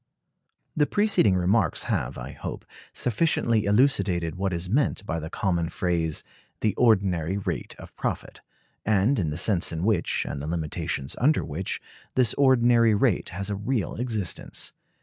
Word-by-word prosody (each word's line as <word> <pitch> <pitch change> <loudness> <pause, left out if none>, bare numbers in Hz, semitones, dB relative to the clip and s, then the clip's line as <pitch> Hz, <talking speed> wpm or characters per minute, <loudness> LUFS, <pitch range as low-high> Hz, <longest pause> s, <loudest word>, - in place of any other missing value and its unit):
The 150 -1 +3
preceding 205 - +3
remarks 90 0 +2
have, - - -2
I - - -6
hope, - - -7 0.3
sufficiently 115 -4 +1
elucidated 100 - +2
what 95 +1 -2
is 85 +1 -2
meant 120 -2 +1
by 85 -4 -2
the 80 0 -6
common 85 -3 -1
phrase, 85 -3 -1 0.4
"the 110 - +2
ordinary 95 -6 +2
rate 100 - -4
of - - -12
profit," - - -4 0.4
and 105 +6 +2
the 80 -7 -1
sense 90 -1 +1
in 80 0 -3
which, 105 -4 +1
and 70 - -4
the 70 - -5
limitations 80 -3 -3
under 145 +5 +3
which, 85 +5 -3 0.4
this 125 -4 +3
ordinary 120 -4 +4
rate 105 -2 +1
has 100 +3 -3
a - - -1
real 105 -1 -1
existence. 110 -7 -3
100 Hz, 150 wpm, -26 LUFS, 85-115 Hz, 0.4 s, ordinary